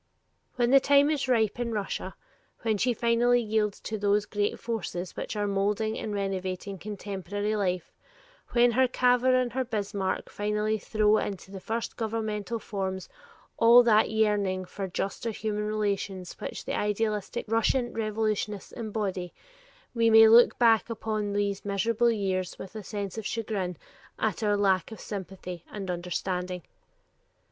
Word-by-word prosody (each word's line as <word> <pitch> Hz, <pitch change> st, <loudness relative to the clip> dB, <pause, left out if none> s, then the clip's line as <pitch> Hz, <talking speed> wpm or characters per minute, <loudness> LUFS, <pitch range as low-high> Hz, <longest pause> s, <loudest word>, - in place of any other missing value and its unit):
When 240 Hz, -1 st, +2 dB
the 275 Hz, -, +8 dB
time 285 Hz, +2 st, +4 dB
is 290 Hz, -3 st, -1 dB
ripe 230 Hz, -3 st, +2 dB
in 235 Hz, -1 st, -2 dB
Russia, 205 Hz, -2 st, -3 dB, 0.5 s
when 220 Hz, -3 st, +1 dB
she 250 Hz, -, +2 dB
finally 240 Hz, +1 st, +3 dB
yields 215 Hz, -2 st, 0 dB
to 215 Hz, -1 st, -4 dB
those 205 Hz, 0 st, +2 dB
great 205 Hz, 0 st, -1 dB
forces 190 Hz, -6 st, -4 dB
which -, -, -5 dB
are 205 Hz, -1 st, 0 dB
molding 205 Hz, +2 st, 0 dB
and 215 Hz, -, -4 dB
renovating 195 Hz, -1 st, -3 dB
contemporary 205 Hz, +1 st, -3 dB
life, 185 Hz, -4 st, -1 dB, 0.6 s
when 240 Hz, 0 st, +4 dB
her 260 Hz, +2 st, +4 dB
Cavour 250 Hz, +1 st, +3 dB
and 250 Hz, -2 st, +1 dB
her 260 Hz, +1 st, 0 dB
Bismark 205 Hz, -4 st, -2 dB
finally 210 Hz, +1 st, -1 dB
throw 215 Hz, +1 st, +2 dB
into 195 Hz, -1 st, -5 dB
the 195 Hz, -, -7 dB
first 225 Hz, +4 st, -4 dB
governmental 220 Hz, -1 st, -2 dB
forms 190 Hz, -3 st, -4 dB, 0.5 s
all 235 Hz, +2 st, +8 dB
that 220 Hz, -2 st, +4 dB
yearning 205 Hz, -4 st, +1 dB
for 195 Hz, +2 st, -5 dB
juster 195 Hz, +5 st, -3 dB
human 210 Hz, -1 st, -2 dB
relations 200 Hz, -3 st, -2 dB
which -, -, -6 dB
the -, -, -2 dB
idealistic 210 Hz, +1 st, -1 dB
Russian 230 Hz, +3 st, +1 dB
revolutionists 215 Hz, -2 st, -2 dB
embody, 205 Hz, -6 st, -4 dB, 0.6 s
we 230 Hz, -1 st, +3 dB
may 225 Hz, 0 st, +9 dB
look 230 Hz, +2 st, +7 dB
back 230 Hz, -1 st, +4 dB
upon 215 Hz, -2 st, -2 dB
these 200 Hz, -1 st, -1 dB
"miserable 225 Hz, +4 st, +1 dB
years" 190 Hz, -5 st, -1 dB
with 195 Hz, +3 st, -9 dB
a 215 Hz, -, -5 dB
sense 205 Hz, 0 st, -5 dB
of 215 Hz, -, -4 dB
chagrin 200 Hz, -6 st, -3 dB, 0.4 s
at 215 Hz, -4 st, -1 dB
our 205 Hz, -1 st, +2 dB
lack 190 Hz, -1 st, +2 dB
of 220 Hz, -, -8 dB
sympathy 185 Hz, -3 st, -7 dB
and 195 Hz, -3 st, -4 dB
understanding. 180 Hz, 0 st, -3 dB
210 Hz, 150 wpm, -28 LUFS, 195-225 Hz, 0.6 s, may